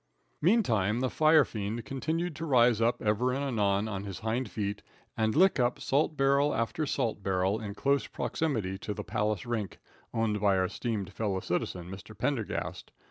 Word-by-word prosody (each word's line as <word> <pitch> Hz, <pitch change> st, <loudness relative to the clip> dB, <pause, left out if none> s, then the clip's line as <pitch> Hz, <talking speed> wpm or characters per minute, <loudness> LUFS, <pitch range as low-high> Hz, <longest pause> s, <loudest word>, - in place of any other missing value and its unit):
Meantime 120 Hz, -, +3 dB
the 130 Hz, 0 st, 0 dB
firefiend 120 Hz, -9 st, +2 dB
continued 160 Hz, +5 st, -2 dB
to 160 Hz, -, -6 dB
rise 120 Hz, -6 st, +4 dB
up 115 Hz, +1 st, +2 dB
ever 110 Hz, +4 st, +2 dB
and 135 Hz, +2 st, -1 dB
anon 105 Hz, -6 st, +1 dB
on 100 Hz, -2 st, -4 dB
his 100 Hz, -3 st, -7 dB
hind 110 Hz, +2 st, -1 dB
feet 100 Hz, -1 st, -3 dB, 0.3 s
and 110 Hz, -1 st, +1 dB
lick 185 Hz, -1 st, +5 dB
up 120 Hz, 0 st, +1 dB
salt 150 Hz, +2 st, +1 dB
barrel 140 Hz, +2 st, +3 dB
after 115 Hz, +7 st, -1 dB
salt 120 Hz, -7 st, -1 dB
barrel 95 Hz, +2 st, 0 dB
in 100 Hz, -2 st, -6 dB
close 140 Hz, +4 st, +1 dB
proximity 110 Hz, -12 st, -2 dB
to 105 Hz, -, -4 dB
the -, -, -5 dB
Palace 105 Hz, -2 st, -1 dB
rink, 115 Hz, -4 st, -3 dB, 0.3 s
owned 110 Hz, -2 st, 0 dB
by 100 Hz, -1 st, +3 dB
our 95 Hz, -, +2 dB
esteemed 100 Hz, -1 st, -3 dB
fellow 100 Hz, -3 st, -1 dB
citizen, 90 Hz, -1 st, -3 dB
Mr. 95 Hz, +3 st, -10 dB
Pendergast. 115 Hz, -1 st, -2 dB
110 Hz, 170 wpm, -30 LUFS, 100-135 Hz, 0.3 s, lick